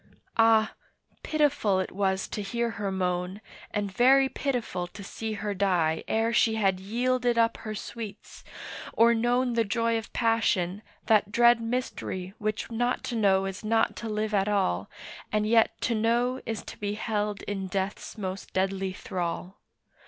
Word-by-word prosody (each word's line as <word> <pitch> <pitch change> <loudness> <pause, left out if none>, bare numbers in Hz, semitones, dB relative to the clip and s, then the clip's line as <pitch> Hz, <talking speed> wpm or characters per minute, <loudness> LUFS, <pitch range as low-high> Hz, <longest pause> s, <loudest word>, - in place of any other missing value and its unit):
Ah! 225 -1 +5 0.5
pitiful 290 -11 +2
it 185 - -2
was 190 0 0
to 210 - -4
hear 235 +3 -1
her 205 -3 -3
moan, 180 +1 -1 0.3
And 205 -2 -2
very 265 +6 +5
pitiful 240 -12 -2
to 200 +3 -10
see 220 +2 -5
her 205 0 -3
die 180 -5 +1
Ere 225 +1 +1
she 225 -1 +3
had 195 -4 +2
yielded 245 +4 0
up 230 0 +3
her 215 -1 -6
sweets, 220 0 -8 0.5
or 235 +1 +5
known 240 +2 +1
The 230 -1 +3
joy 230 +2 +1
of 225 - -11
passion, 215 -5 +1 0.2
that 210 -2 +3
dread 235 +1 +5
mystery 225 -6 -3
Which 215 +2 -2
not 245 +2 0
to 245 - -3
know 195 -3 +3
is 195 +1 -5
not 225 +1 +2
to 230 - -5
live 215 0 -2
at 195 -1 +2
all, 100 - 0 0.4
And 210 0 +1
yet 225 +1 +3
to 240 - +1
know 235 +3 +1
is 225 -2 -3
to - - -10
be 205 0 -2
held 210 -2 -2
in 195 -2 -3
death's 190 +4 -3
most 190 -2 -5
deadly 190 0 0
thrall. 180 +1 -4
215 Hz, 160 wpm, -28 LUFS, 195-230 Hz, 0.5 s, Ah